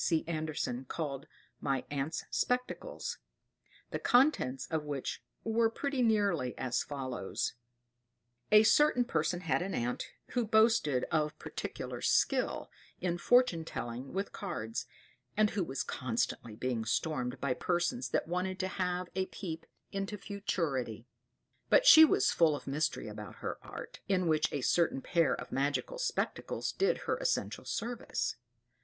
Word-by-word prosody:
C. 160 -2 +2
Andersen, 155 -6 -2
called, 140 0 -4 0.3
My 135 -2 -1
Aunt's 145 +3 -2
Spectacles; 250 0 -2 0.7
the - - -2
contents 245 - +3
of 160 -2 -2
which 145 -3 -4 0.2
were 225 0 +3
pretty 275 +3 -2
nearly 200 - +2
as 130 -1 0
follows: 130 -8 -3 1.0
"A 215 0 +9
certain 250 +1 +5
person 165 -2 0
had 165 - +1
an 190 +1 -2
aunt, 120 +1 -2 0.2
who 245 - 0
boasted 220 - +3
of 150 -1 +1
particular - - -5
skill - - +1 0.3
in 175 -1 -1
fortune 245 -7 +4
telling 125 -3 -5
with 195 +2 -2
cards, 115 - -4 0.5
and 215 -1 +4
who 200 - 0
was 135 -4 -2
constantly 115 -2 -2
being 120 -1 -1
stormed 125 +3 -1
by 140 -2 +1
persons 175 - 0
that - - 0
wanted 180 +2 -1
to 185 - 0
have 180 -1 -1
a 190 0 -1
peep 165 -4 -6 0.2
into 195 +1 -3
futurity. 155 - -2 0.6
But - - +6
she 320 -9 +11
was - - +3
full 160 -3 +4
of - - -8
mystery 150 -2 -1
about 105 0 -8
her - - -5
art, - - -9
in 185 -3 +2
which 155 -1 +2
a 145 - -2
certain 160 -1 +2
pair 165 -3 +2
of - - -8
magic 140 +2 0
spectacles - - -2
did 410 +6 +2
her - - 0
essential - - -1
service. 240 +1 -2
165 Hz, 140 wpm, -32 LUFS, 135-210 Hz, 1.0 s, she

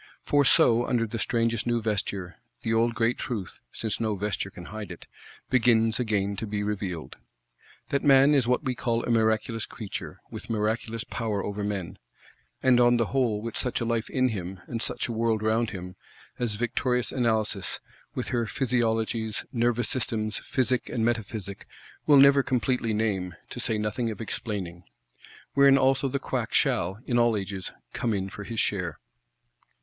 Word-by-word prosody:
For 145 0 +3
so, 120 -2 +5
under 120 -2 +1
the 115 +1 -5
strangest 115 0 0
new 120 0 +2
vesture, 100 -4 -2 0.3
the 115 - 0
old 115 +1 +2
great 115 +1 +1
truth 105 -7 -4
(since 110 -2 -3
no 110 -2 0
vesture 100 0 -2
can 90 -2 -11
hide 110 +1 -7
it) 85 - -9 0.5
begins 115 -2 +4
again 100 -4 0
to 110 - -3
be 105 0 -2
revealed: 95 -6 -4 0.7
That 140 - 0
man 140 +1 +6
is 135 -5 +3
what 125 +4 +2
we 130 -3 0
call 115 -1 -1
a - - -1
miraculous 110 0 +1
creature, 105 -5 -7
with - - -8
miraculous 110 +1 -1
power 110 -4 -2
over 105 0 -3
men; 100 -4 -4 0.6
and, 130 -2 +5
on 120 0 +5
the 115 - +2
whole, 115 -6 +1
with 115 - -5
such 125 - 0
a 115 - -1
Life 115 -1 -1
in 130 -1 +2
him, 95 -3 -5
and 115 -2 -4
such - - -1
a - - -4
World 115 -1 0
round 110 +1 +2
him, 90 -2 -7 0.4
as 120 -4 0
victorious 125 +2 0
Analysis, 110 -5 0 0.4
with 125 - -3
her 120 -2 0
Physiologies, 115 -4 0
Nervous 120 0 +1
systems, 110 -4 0
Physic 130 -1 0
and 115 -3 0
Metaphysic, 110 -4 -3 0.4
will 145 -2 +7
never 140 0 +7
completely 125 -3 0
name, 100 -5 -1 0.2
to - - -6
say 110 - 0
nothing 105 +3 -1
of 110 - -6
explaining. 95 -6 -4 0.7
Wherein 140 -1 +6
also 135 +1 +3
the 135 +1 -1
Quack - - -3
shall, 90 +4 +2
in 120 -2 +1
all 120 -2 +3
ages, 95 -1 -4 0.2
come 115 -3 0
in 95 0 -2
for 105 - -7
his 115 +2 -4
share. 90 -6 0
115 Hz, 170 wpm, -27 LUFS, 105-120 Hz, 0.7 s, will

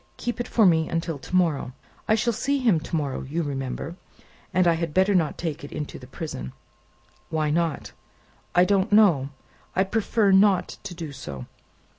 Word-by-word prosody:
"Keep 240 0 -3
it 240 - -2
for 220 - +3
me 160 -3 +3
until 165 -3 -2
to 180 - -5
morrow. 160 -8 +1 0.3
I 215 - +4
shall 230 +2 +1
see 275 +6 0
him 230 -11 +3
to 160 - -5
morrow, 145 -4 -2
you 160 +6 -3
remember, 140 +4 -4 0.5
and 185 -1 +3
I 170 - +5
had 165 -2 -3
better 190 +2 +4
not 165 -5 +1
take 160 -3 -4
it 145 - -8
into 150 -1 -5
the 125 - -12
prison." 130 - -6 0.8
"Why 155 -2 0
not?" 165 0 -1 0.6
"I 175 +1 +6
don't 195 0 +1
know; 180 -11 +5 0.5
I 190 - +4
prefer 210 0 +1
not 190 -1 +3
to 185 -3 -6
do 165 -3 -6
so. 70 - -7
170 Hz, 180 wpm, -25 LUFS, 150-195 Hz, 0.8 s, I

